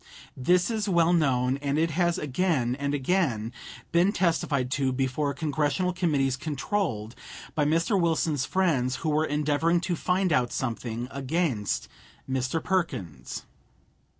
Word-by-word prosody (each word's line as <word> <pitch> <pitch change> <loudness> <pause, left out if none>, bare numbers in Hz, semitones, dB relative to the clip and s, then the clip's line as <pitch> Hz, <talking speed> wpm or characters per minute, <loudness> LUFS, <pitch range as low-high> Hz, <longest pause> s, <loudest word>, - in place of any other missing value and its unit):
This 180 - +2
is 215 -2 -1
well 170 -1 +4
known, 130 -5 +2
and 140 0 -1
it 165 +1 +2
has 175 +1 +1
again 140 -4 0
and 140 0 0
again 130 - 0 0.4
been 175 +4 +4
testified 160 - 0
to 135 -1 +1
before 135 +2 0
Congressional 155 +4 0
committees 145 -7 +1
controlled 140 - -2 0.4
by 150 - +1
Mr. 165 +6 +2
Wilson's 160 -4 +1
friends 145 -10 +1
who - - +2
were 155 +1 +2
endeavoring 150 +3 +1
to 175 0 -1
find 180 +1 +1
out 125 -4 +2
something 120 -1 -3
against 140 - -1 0.4
Mr. 130 +4 -1
Perkins. 90 - -2
150 Hz, 130 wpm, -27 LUFS, 130-170 Hz, 0.4 s, well